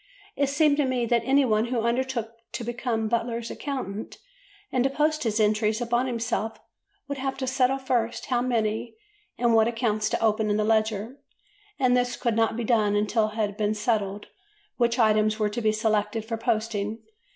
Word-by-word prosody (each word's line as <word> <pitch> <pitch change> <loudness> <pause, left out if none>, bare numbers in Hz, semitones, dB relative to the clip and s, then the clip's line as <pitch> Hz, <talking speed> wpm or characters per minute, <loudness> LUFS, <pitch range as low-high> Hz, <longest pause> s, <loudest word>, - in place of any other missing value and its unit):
It 280 -1 +1
seemed 290 0 +3
to 290 - +2
me 255 -2 0
that 235 0 +2
any 275 +1 +4
one 215 -2 +2
who 240 -1 -1
undertook 235 -1 -1 0.2
to - - -4
become 235 -1 -2
Butler's 235 0 -2
accountant 225 -7 -5 0.5
and 250 - +2
to 270 - +2
post 305 +2 +1
his 225 -3 0
entries 215 +1 +2
upon 240 +1 0
himself 230 -2 -2 0.5
would 280 -1 -4
have 270 0 -2
to 265 - -2
settle 260 0 +2
first 240 -3 -1
how 245 -2 0
many 230 -2 -1 0.4
and 240 -1 +2
what 220 0 +5
accounts 225 -3 0
to - - -1
open 220 -1 +1
in 205 - +2
the 215 - +1
ledger, 220 +2 0 0.6
and 250 -2 +3
this 245 0 +1
could 235 -3 0
not 225 0 +1
be 240 - -2
done 215 -3 +2
until 215 +1 +2
it 215 - -11
had 210 -2 -1
been 215 0 0
settled 210 -2 -1 0.5
which 235 -1 +2
items 215 -2 +3
were 210 -1 +1
to 220 +3 -4
be 215 -1 +3
selected 215 0 0
for 230 0 -3
posting. 220 -1 -2
230 Hz, 185 wpm, -26 LUFS, 215-250 Hz, 0.6 s, what